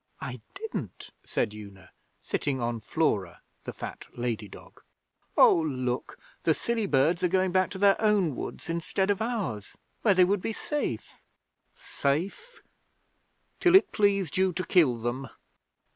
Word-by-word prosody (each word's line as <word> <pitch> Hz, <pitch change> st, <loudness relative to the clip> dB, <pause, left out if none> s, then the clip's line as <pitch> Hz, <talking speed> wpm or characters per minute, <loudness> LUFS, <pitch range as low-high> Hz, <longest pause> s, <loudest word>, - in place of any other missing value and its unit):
'I 125 Hz, -3 st, -6 dB
didn't,' 445 Hz, +2 st, -6 dB
said 105 Hz, -, -1 dB
Una, 100 Hz, -3 st, -12 dB, 0.3 s
sitting 140 Hz, -3 st, -1 dB
on 120 Hz, -1 st, -2 dB
Flora, 110 Hz, -, -1 dB, 0.2 s
the -, -, -4 dB
fat -, -, -8 dB
lady 115 Hz, -3 st, -2 dB
dog. -, -, -14 dB, 0.6 s
'Oh, -, -, +8 dB
look! 130 Hz, -6 st, -2 dB, 0.2 s
The -, -, +2 dB
silly 230 Hz, -3 st, -1 dB
birds 155 Hz, +4 st, +2 dB
are 180 Hz, -, +3 dB
going 185 Hz, +1 st, +1 dB
back 185 Hz, -1 st, +2 dB
to 190 Hz, -, -7 dB
their 200 Hz, 0 st, +4 dB
own 205 Hz, -, +2 dB
woods -, -, -6 dB
instead 170 Hz, +4 st, 0 dB
of 200 Hz, -, -1 dB
ours, 200 Hz, -, -3 dB, 0.2 s
where 205 Hz, -4 st, +4 dB
they 180 Hz, 0 st, +6 dB
would 195 Hz, +1 st, +1 dB
be 225 Hz, -, -2 dB
safe.' 295 Hz, +6 st, -4 dB, 0.6 s
'Safe 185 Hz, -, -3 dB, 1.0 s
till 360 Hz, 0 st, +5 dB
it 385 Hz, -, +6 dB
pleased 200 Hz, -6 st, +1 dB
you 190 Hz, 0 st, +3 dB
to 180 Hz, +1 st, -3 dB
kill 150 Hz, -11 st, +4 dB
them.' 120 Hz, +4 st, -3 dB
170 Hz, 145 wpm, -28 LUFS, 125-200 Hz, 1.0 s, Oh